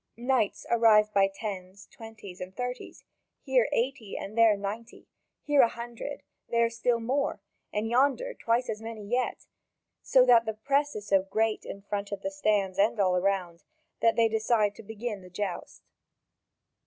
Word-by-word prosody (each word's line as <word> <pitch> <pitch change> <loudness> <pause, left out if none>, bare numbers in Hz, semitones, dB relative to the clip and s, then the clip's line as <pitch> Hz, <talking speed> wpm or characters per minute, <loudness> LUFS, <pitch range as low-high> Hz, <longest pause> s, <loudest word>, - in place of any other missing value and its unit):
Knights 245 -3 0
arrive 215 -2 +5
by 195 -1 +4
tens, 195 -2 -7
twenties, 215 -5 -12
and 185 +1 -8
thirties, 250 0 -5 0.4
here 260 -4 +2
eighty 240 -4 -2
and 205 - -7
there 225 -3 +5
ninety, 215 +4 -6 0.4
here 290 -2 +4
a 240 - +6
hundred, 235 +4 -7 0.3
there 235 0 +2
still 235 0 0
more, 275 +5 -1 0.3
and 210 +1 -1
yonder 280 - +1
twice 235 - 0
as 215 0 -4
many 225 -2 -7
yet; 245 +4 -2 0.6
so 255 -1 +4
that 235 -2 +6
the 220 - -2
press 280 +5 0
is 210 - -6
so 195 -2 +3
great 215 +3 -1
in 200 - -8
front 200 0 -4
of 200 - -5
the 290 - -2
stands 205 -9 0
and 210 +2 +2
all 185 -2 +3
around 180 -2 -1 0.4
that 230 -1 +4
they 230 -1 +4
decide 220 -1 +1
to - - -12
begin 220 -1 -6
the 180 - -13
joust. 185 0 -5
225 Hz, 165 wpm, -28 LUFS, 200-240 Hz, 0.6 s, a